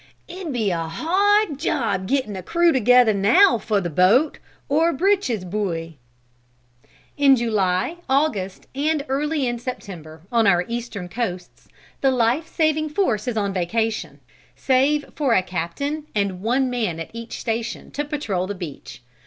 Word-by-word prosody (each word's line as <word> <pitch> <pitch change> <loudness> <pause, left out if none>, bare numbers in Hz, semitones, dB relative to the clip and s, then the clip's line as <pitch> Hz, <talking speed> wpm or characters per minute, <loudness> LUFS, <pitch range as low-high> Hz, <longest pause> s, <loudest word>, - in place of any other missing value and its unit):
It'd 355 -2 -6
be 220 -6 0
a 165 -2 -2
hard 375 - +2
job 225 - -1
getting 255 -6 -1
a 190 - -5
crew 340 - +2
together 250 -3 +5
now 230 - +5
for 215 -2 0
the 175 -3 -3
boat, 210 - +3 0.3
or 320 +4 +3
breeches 330 - +1
buoy." 170 -5 -3 1.2
In 280 -2 +6
July, 215 - 0
August, 255 -10 0
and 290 +1 0
early 290 +1 0
in 240 -1 -2
September, 175 - -8
on 230 -3 +3
our 175 -2 +3
Eastern 235 -6 -5
coasts, 180 -4 -5 0.3
the 270 - +4
life 255 +5 +1
saving 310 -1 0
force 255 - 0
is 235 -3 -2
on 200 -2 0
vacation, 220 +5 -2 0.4
save 275 +3 +2
for 275 -6 +2
a 185 - +3
captain 190 - -4
and 200 -3 -1
one 250 +5 +1
man 220 -10 -2
at 165 - -7
each 230 0 -7
station 230 0 -4
to 290 - -2
patrol 225 - -2
the 205 - -4
beach. 160 -8 -9
235 Hz, 150 wpm, -22 LUFS, 190-290 Hz, 1.2 s, In